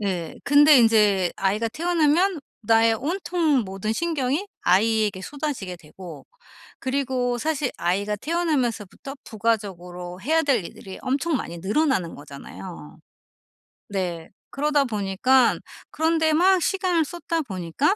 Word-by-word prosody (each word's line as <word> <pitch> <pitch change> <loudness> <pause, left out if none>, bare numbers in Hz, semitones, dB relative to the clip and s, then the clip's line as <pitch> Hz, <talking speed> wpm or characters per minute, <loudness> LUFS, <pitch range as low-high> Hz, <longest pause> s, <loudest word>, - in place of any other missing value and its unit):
네. 180 -5 -3
근데 290 0 +7
인제 210 -6 +4
아이가 210 +4 0
태어나면 335 - +1 0.2
나의 225 +1 +4
온통 320 - 0
모든 195 +3 -3
신경이 305 - -1 0.2
아이에게 210 0 +2
쏟아지게 270 -6 -5
되고 170 0 -12 0.5
그리고 260 -2 -1
사실 295 -1 -1
아이가 200 +4 -1
태어나면서부터 275 - -2
부가적으로 185 -5 -3
해야 320 +8 +2
될 260 - +1
일들이 190 +2 -10
엄청 280 +4 0
많이 170 -7 -6
늘어나는 200 - 0
거잖아요. 95 - -10 0.9
네. 175 -4 -3 0.2
그러다 295 0 +1
보니깐 230 +3 +2 0.3
그런 320 +1 +1
데 315 -1 +2
막 365 +3 +4
시간을 365 -3 +1
쏟다 335 0 -3
보니까 195 - -1
240 Hz, 295 characters per minute, -24 LUFS, 190-305 Hz, 0.9 s, 근데